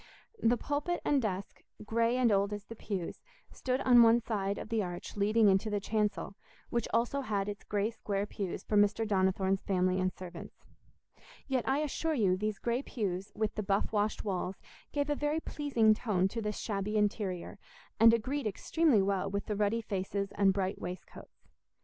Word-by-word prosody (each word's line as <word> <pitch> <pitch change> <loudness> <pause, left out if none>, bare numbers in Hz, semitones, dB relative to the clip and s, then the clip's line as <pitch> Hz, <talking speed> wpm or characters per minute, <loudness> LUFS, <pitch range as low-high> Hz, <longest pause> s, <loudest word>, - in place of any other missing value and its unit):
The 235 +2 +3
pulpit 295 +7 -2
and 285 -2 +3
desk, 195 -3 -4 0.2
grey 230 +3 +1
and 245 -3 +3
old 200 +1 +2
as 205 0 -6
the 230 - -9
pews, 195 -5 -5 0.3
stood 255 +1 -2
on 245 -2 +7
one 230 0 +6
side 205 -4 -2
of - - -7
the 225 -2 +1
arch 175 -2 -6
leading 210 +2 +3
into 195 +3 +3
the 205 -1 0
chancel, 210 -1 -1 0.4
which 235 - 0
also 240 +5 +1
had 205 -6 -1
its 205 0 -5
grey 210 +2 -1
square 205 -3 -2
pews 200 -3 -5
for 215 - -2
Mr. 205 +2 +3
Donnithorne's 190 -1 +1
family 185 -1 +1
and 185 0 +1
servants. 175 -2 -10 0.8
Yet 260 -3 0
I 280 +3 +2
assure 315 +2 -1
you 195 -7 +3
these 210 +2 -2
grey 240 +2 -1
pews, 195 -8 -3
with 215 0 -1
the 215 - -3
buff 200 +1 0
washed 210 0 0
walls, 185 -1 -2 0.3
gave 285 0 0
a 295 - +1
very 295 +2 0
pleasing 270 -9 +2
tone 205 -4 +1
to 230 +3 -4
this 210 -1 -3
shabby 210 0 -2
interior, 205 -4 -1 0.4
and 225 +1 +8
agreed 255 +3 -1
extremely 245 - +2
well 195 0 0
with 200 +1 -3
the 210 - -2
ruddy 210 +3 +1
faces 200 -1 -3
and 195 -1 +3
bright 190 0 -2
waistcoats. 180 +1 -9
210 Hz, 180 wpm, -31 LUFS, 195-230 Hz, 0.8 s, and